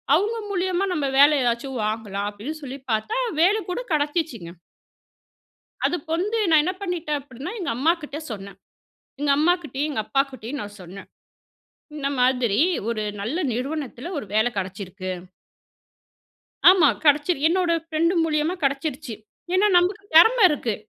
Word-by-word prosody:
அவங்க 440 Hz, +4 st, 0 dB
மூலியமா 370 Hz, 0 st, 0 dB
நம்ப 295 Hz, -4 st, -1 dB
வேல 285 Hz, +2 st, +8 dB
ஏதாச்சும் 245 Hz, +1 st, -1 dB
வாங்கலாம் 210 Hz, -2 st, -3 dB
அப்டின் 275 Hz, +10 st, -7 dB
சொல்லி 270 Hz, 0 st, -6 dB
பார்த்தா 320 Hz, -, -1 dB, 0.2 s
வேல 390 Hz, +5 st, +4 dB
கூட 360 Hz, -, -2 dB
கெடைச்சுசுங்க. 295 Hz, -, -1 dB, 1.4 s
அதுக்கு 350 Hz, -2 st, -3 dB
வந்து 420 Hz, +6 st, -1 dB
நான் 310 Hz, -2 st, +6 dB
என்ன 365 Hz, -, 0 dB
பண்ணிட்டேன் 340 Hz, -6 st, -2 dB
அப்பிடின்னா, 265 Hz, -, -8 dB
எங்க 345 Hz, -, -2 dB
அம்மாக்கிட்ட 300 Hz, +1 st, 0 dB
சொன்னேன். 200 Hz, -2 st, -8 dB, 0.6 s
எங்க 290 Hz, -1 st, +1 dB
அம்மாக்கிட்டயும், 305 Hz, -3 st, 0 dB
எங்க 260 Hz, -7 st, -2 dB
அப்பாக்கிட்டயும் 270 Hz, -1 st, -2 dB
நான் 205 Hz, 0 st, -10 dB
சொன்னேன். 185 Hz, +3 st, -11 dB, 0.9 s
இந்த 280 Hz, -2 st, -2 dB
மாதிரி 250 Hz, -4 st, +2 dB, 0.3 s
ஒரு 215 Hz, -2 st, -2 dB, 0.2 s
நல்ல 240 Hz, -, -2 dB, 0.2 s
நிறுவனத்துல 275 Hz, +2 st, -4 dB
ஒரு 250 Hz, -, -4 dB
வேல 220 Hz, +3 st, +3 dB
கிடச்சிருக்கு. 185 Hz, 0 st, -5 dB, 1.6 s
ஆமா. 360 Hz, -5 st, +5 dB, 0.2 s
கிடச்சிரு 295 Hz, +2 st, +3 dB
என்னோட 355 Hz, -1 st, +1 dB
ஃபிரெண்ட் 330 Hz, +3 st, +1 dB
மூலியமா 310 Hz, +2 st, 0 dB
கிடச்சிருச்சு. 275 Hz, -2 st, -2 dB, 0.4 s
ஏனா 400 Hz, +3 st, +4 dB
நமக்கு 370 Hz, +4 st, +2 dB
திறம 450 Hz, +9 st, +7 dB
இருக்கு. 245 Hz, -7 st, -1 dB
290 Hz, 130 wpm, -23 LUFS, 235-335 Hz, 1.6 s, வேல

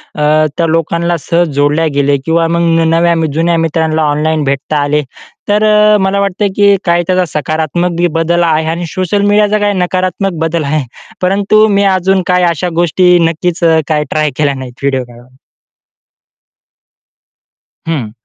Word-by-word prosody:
अ, 155 Hz, +1 st, +2 dB
त्या 165 Hz, -, +1 dB
लोकांना 170 Hz, +1 st, -1 dB
सहज 170 Hz, -1 st, +1 dB
जोडल्या 145 Hz, +3 st, +1 dB
गेले 140 Hz, 0 st, +1 dB
किंवा 165 Hz, 0 st, +1 dB
मग 170 Hz, 0 st, 0 dB
न 165 Hz, -, +1 dB
नव्या 170 Hz, +1 st, +2 dB, 0.2 s
जुन्या 165 Hz, +2 st, +1 dB
मित्रांना 160 Hz, -1 st, 0 dB
ऑनलाईन 155 Hz, +1 st, 0 dB
भेटता 140 Hz, +2 st, -2 dB
आले 150 Hz, +1 st, 0 dB, 0.5 s
तर 210 Hz, +1 st, +2 dB
अ, 210 Hz, 0 st, +4 dB
मला 190 Hz, +1 st, 0 dB
वाटतं 200 Hz, +1 st, -1 dB
की 200 Hz, -1 st, +4 dB
काय 175 Hz, 0 st, +2 dB
त्याचा 185 Hz, 0 st, +1 dB
सकारात्मक 160 Hz, +3 st, -2 dB
बी 175 Hz, 0 st, +2 dB
बदल 170 Hz, +1 st, +1 dB
आहे 160 Hz, -1 st, +1 dB
आणि 170 Hz, +1 st, -3 dB
सोशल 185 Hz, +4 st, -2 dB
मीडियाचा 210 Hz, +1 st, +2 dB
काही 205 Hz, 0 st, 0 dB
नकारात्मक 185 Hz, +2 st, -1 dB
बदल 165 Hz, 0 st, -1 dB
आहे. 150 Hz, +1 st, -1 dB, 0.4 s
परंतु 200 Hz, +3 st, +2 dB
मी 200 Hz, -1 st, +1 dB
अजून 190 Hz, -1 st, +1 dB
काही 180 Hz, 0 st, +2 dB
अशा 170 Hz, +1 st, -1 dB
गोष्टी 175 Hz, +1 st, +3 dB
नक्कीच 175 Hz, +2 st, -3 dB
अ, 160 Hz, -1 st, +4 dB
काय 150 Hz, -2 st, 0 dB
ट्राय 155 Hz, -1 st, 0 dB
केल्या 145 Hz, -2 st, +1 dB
नाहीत 130 Hz, -2 st, -8 dB
व्हिडिओ 135 Hz, -2 st, 0 dB
काढून. 120 Hz, +1 st, -17 dB, 2.5 s
हं. 135 Hz, -10 st, -3 dB
170 Hz, 160 wpm, -12 LUFS, 155-185 Hz, 2.5 s, अ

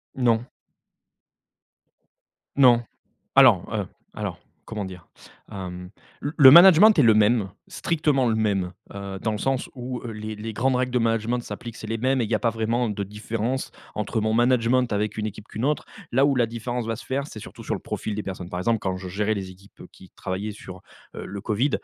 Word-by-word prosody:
Non. 120 Hz, -1 st, +1 dB, 2.1 s
Non, 120 Hz, -3 st, +6 dB, 0.5 s
alors, -, -, +6 dB
heu, -, -, -1 dB, 0.3 s
alors, -, -, -4 dB, 0.3 s
comment 105 Hz, -3 st, -4 dB
dire? 90 Hz, -2 st, -10 dB, 0.4 s
Hem, 90 Hz, -2 st, -7 dB, 0.3 s
le 145 Hz, -, -3 dB
le 135 Hz, -4 st, +10 dB
management 190 Hz, +5 st, +9 dB
est 150 Hz, -, +5 dB
le 115 Hz, -3 st, +6 dB
même, 105 Hz, -1 st, +3 dB, 0.2 s
strictement 150 Hz, -6 st, 0 dB
le 110 Hz, -, +1 dB
même, 100 Hz, -5 st, 0 dB, 0.2 s
heu, 100 Hz, -1 st, -6 dB
dans 110 Hz, -, -1 dB
le 105 Hz, -, -3 dB
sens 135 Hz, +1 st, -1 dB
où, 125 Hz, 0 st, -5 dB
heu, 115 Hz, -, -5 dB
les 110 Hz, 0 st, -6 dB
les 110 Hz, +2 st, -6 dB
grandes 125 Hz, +4 st, +1 dB
règles 125 Hz, 0 st, -1 dB
de 125 Hz, -, +2 dB
management 115 Hz, +1 st, 0 dB
s'appliquent, 115 Hz, -1 st, -8 dB
c'est 110 Hz, -, -8 dB
les 115 Hz, 0 st, -2 dB
mêmes 130 Hz, +2 st, +1 dB
et -, -, +1 dB
il 105 Hz, -, -6 dB
y -, -, +3 dB
a -, -, -3 dB
pas 115 Hz, -, +1 dB
vraiment 115 Hz, +2 st, -1 dB
de 105 Hz, -1 st, -3 dB
différence 110 Hz, +5 st, -3 dB, 0.2 s
entre 105 Hz, +2 st, -1 dB
mon 110 Hz, +1 st, 0 dB
management 120 Hz, 0 st, +2 dB
avec 105 Hz, 0 st, -1 dB
une 110 Hz, -1 st, -2 dB
équipe 105 Hz, +1 st, -8 dB
qu'une 110 Hz, -, -4 dB
autre. 150 Hz, 0 st, 0 dB, 0.3 s
Là 135 Hz, +3 st, +4 dB
où 140 Hz, -2 st, +2 dB
la 120 Hz, -2 st, +3 dB
différence 120 Hz, +1 st, -4 dB
va 115 Hz, -, -1 dB
se 115 Hz, -, -10 dB
faire, 140 Hz, +2 st, -2 dB
c'est 110 Hz, -, -9 dB
surtout -, -, -11 dB
sur -, -, -2 dB
le -, -, -5 dB
profil 110 Hz, -, -4 dB
des 105 Hz, -, -3 dB
personnes. 95 Hz, -3 st, -6 dB
Par 90 Hz, 0 st, -4 dB
exemple, 115 Hz, +3 st, +1 dB
quand 95 Hz, -2 st, -2 dB
je 95 Hz, 0 st, -7 dB
gérais 105 Hz, +4 st, -1 dB
les 95 Hz, -2 st, -5 dB
équipes, 95 Hz, +2 st, -18 dB
heu, -, -, -11 dB
qui 95 Hz, -, -17 dB
travaillaient 100 Hz, +3 st, -4 dB
sur, 95 Hz, -3 st, -11 dB, 0.3 s
heu, -, -, -6 dB
le 100 Hz, 0 st, -6 dB
Covid, 120 Hz, +8 st, 0 dB
110 Hz, 210 wpm, -24 LUFS, 105-125 Hz, 2.1 s, le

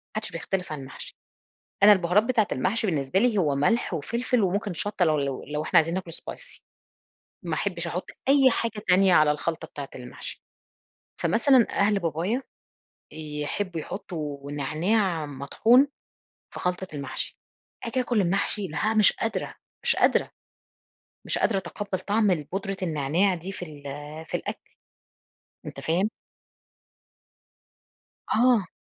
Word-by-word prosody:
ما 215 Hz, -, -1 dB
حدش 180 Hz, -, -4 dB
بيختلف 180 Hz, +1 st, -3 dB
على 145 Hz, -3 st, -4 dB
المحشي 130 Hz, -, -9 dB, 0.7 s
أنا 210 Hz, -, +10 dB
البُهارات 190 Hz, +2 st, +4 dB
بتاعة 230 Hz, -4 st, +2 dB
المحشي 205 Hz, -, 0 dB
بالنسبة 145 Hz, 0 st, +1 dB
لي 230 Hz, -1 st, +2 dB
هو 150 Hz, -6 st, +2 dB
ملح 190 Hz, +8 st, +1 dB
وفلفل 235 Hz, -, 0 dB
وممكن 200 Hz, +1 st, 0 dB
شطَّة 195 Hz, +1 st, 0 dB
لو 155 Hz, -2 st, +2 dB
لو 140 Hz, -2 st, -2 dB
لو 150 Hz, +1 st, -3 dB
إحنا -, -, +2 dB
عايزين 165 Hz, +1 st, +4 dB
ناكلُه 180 Hz, -3 st, -4 dB
Spicy -, -, -8 dB, 0.9 s
ما 165 Hz, -3 st, -1 dB
احبش 175 Hz, -4 st, -2 dB
أحط 175 Hz, +2 st, -4 dB, 0.2 s
أي 275 Hz, -1 st, +6 dB
حاجة 225 Hz, -3 st, -2 dB
تانية 185 Hz, 0 st, +5 dB
على 155 Hz, -2 st, +6 dB
الخلطة 160 Hz, +2 st, -2 dB
بتاعة 140 Hz, -1 st, -7 dB
المحشي، 125 Hz, 0 st, -8 dB, 0.8 s
فمثلًا 250 Hz, +1 st, +4 dB
أهل 200 Hz, 0 st, +2 dB
بابايا 175 Hz, -, -1 dB, 0.7 s
يحبوا 155 Hz, +4 st, -4 dB
يحطوا 150 Hz, -7 st, -6 dB
نعناع 160 Hz, +4 st, 0 dB
مطحون 225 Hz, -, +3 dB, 0.7 s
في -, -, -6 dB
خلطة 180 Hz, +1 st, -1 dB
المحشي، 140 Hz, -2 st, -4 dB, 0.5 s
آجي 240 Hz, +2 st, -1 dB
آكل 240 Hz, -3 st, +1 dB
المحشي 195 Hz, +2 st, 0 dB
لا 180 Hz, +9 st, 0 dB
مش 215 Hz, -2 st, +6 dB
قادرة 225 Hz, -, -3 dB, 0.3 s
مش -, -, +4 dB
قادرة -, -, +3 dB, 1.0 s
مش -, -, +1 dB
قادرة 200 Hz, -4 st, +2 dB
أتقبَّل 195 Hz, 0 st, -4 dB
طعم 210 Hz, +1 st, +2 dB, 0.2 s
بودرة 195 Hz, 0 st, -2 dB
النعناع 165 Hz, +4 st, +1 dB
دي 180 Hz, +3 st, -6 dB
في 180 Hz, -, -6 dB
ال 150 Hz, -3 st, -12 dB, 0.4 s
في -, -, -2 dB
الأكل، -, -, -7 dB, 1.0 s
أنت -, -, -7 dB
فاهم؟ 185 Hz, +7 st, +1 dB, 2.2 s
آه. 235 Hz, -4 st, +4 dB
185 Hz, 135 wpm, -26 LUFS, 155-210 Hz, 2.2 s, أنا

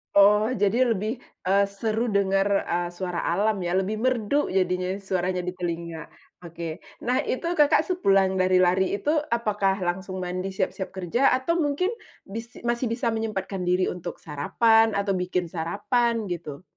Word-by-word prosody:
Oh, 210 Hz, +3 st, +6 dB
jadi 235 Hz, +4 st, +3 dB
lebih, 215 Hz, +1 st, -1 dB, 0.4 s
eee, 200 Hz, +1 st, +4 dB, 0.2 s
seru 225 Hz, +1 st, 0 dB
dengar, 195 Hz, 0 st, +2 dB, 0.2 s
eee, 175 Hz, 0 st, -1 dB
suara 175 Hz, -1 st, -4 dB
alam 210 Hz, +5 st, +2 dB
ya, 175 Hz, -, -2 dB
lebih 200 Hz, +3 st, -1 dB
merdu 255 Hz, +2 st, +1 dB
jadinya 185 Hz, -1 st, 0 dB
suaranya 185 Hz, -2 st, -1 dB
di 180 Hz, -, -3 dB
telinga. 170 Hz, -2 st, -4 dB, 0.4 s
Oke, 170 Hz, 0 st, -7 dB, 0.2 s
nah 250 Hz, +1 st, +2 dB
itu 335 Hz, +6 st, -2 dB
Kakak 295 Hz, 0 st, +5 dB
sepulang 195 Hz, -, +2 dB
dari 185 Hz, 0 st, +3 dB
lari 185 Hz, +1 st, +3 dB
itu, 290 Hz, -, -3 dB, 0.2 s
apakah 205 Hz, -4 st, +1 dB
langsung 185 Hz, +1 st, -3 dB
mandi 185 Hz, +1 st, -3 dB
siap-siap 190 Hz, 0 st, -2 dB
kerja, 195 Hz, +8 st, +1 dB
atau 260 Hz, +6 st, 0 dB
mungkin 290 Hz, +6 st, 0 dB, 0.4 s
bis 225 Hz, +4 st, -8 dB
masih 240 Hz, +1 st, 0 dB
bisa 235 Hz, +1 st, -1 dB
menyempatkan 200 Hz, -4 st, -3 dB
diri 180 Hz, +1 st, +2 dB
untuk 175 Hz, -1 st, -5 dB
sarapan, 225 Hz, -, +3 dB
atau 200 Hz, -1 st, 0 dB
bikin 180 Hz, -1 st, -1 dB
sarapan, 215 Hz, +7 st, 0 dB
gitu? 170 Hz, -3 st, -6 dB
195 Hz, 150 wpm, -25 LUFS, 180-225 Hz, 0.4 s, Oh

